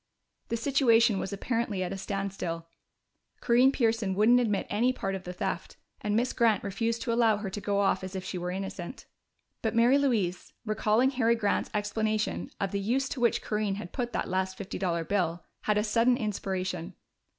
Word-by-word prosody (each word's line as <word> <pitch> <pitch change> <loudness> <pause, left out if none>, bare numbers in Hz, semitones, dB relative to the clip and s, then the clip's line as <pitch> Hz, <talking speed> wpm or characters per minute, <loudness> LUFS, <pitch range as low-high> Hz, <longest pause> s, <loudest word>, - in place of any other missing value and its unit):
The 230 - -1
situation 230 -5 +4
was 195 - -3
apparently 210 -1 -1
at 180 +1 -3
a - - -4
standstill. 190 -4 -3 0.7
Corinne 250 +2 +4
Pearson 225 -7 +1
wouldn't 225 +5 +5
admit 210 -5 0
any 235 +5 +2
part 195 -6 -3
in 190 - -3
the 180 - -7
theft, 180 - -4 0.2
and 210 0 0
Miss 240 +3 +1
Grant 225 -5 +3
refused 225 +4 -1
to 235 - 0
allow 230 -2 +4
her 205 -2 -5
to 205 - -5
go 200 0 0
off 195 -1 +1
as 185 +1 -6
if 190 - -3
she 185 - -4
were 180 +1 -3
innocent. 190 +3 -5 0.6
But 220 0 -1
Mary 240 +4 +5
Louise, 215 -10 0
recalling 220 +4 +2
Harry 235 -3 +2
Grant's 205 -3 0
explanation 215 +1 -1
of 195 - -1
the 200 - -1
use 250 +7 0
to 265 - -4
which 235 -1 +2
Corinne 210 -2 -1
had 190 -4 -8
put 240 -2 -2
that - - -1
last 190 0 -1
fifty 200 0 -6
dollar 170 -3 0
bill, 175 -2 -1 0.2
had 210 -1 +2
a 210 - +2
sudden 235 +3 +3
inspiration. 190 -5 -3
210 Hz, 190 wpm, -29 LUFS, 190-230 Hz, 0.7 s, wouldn't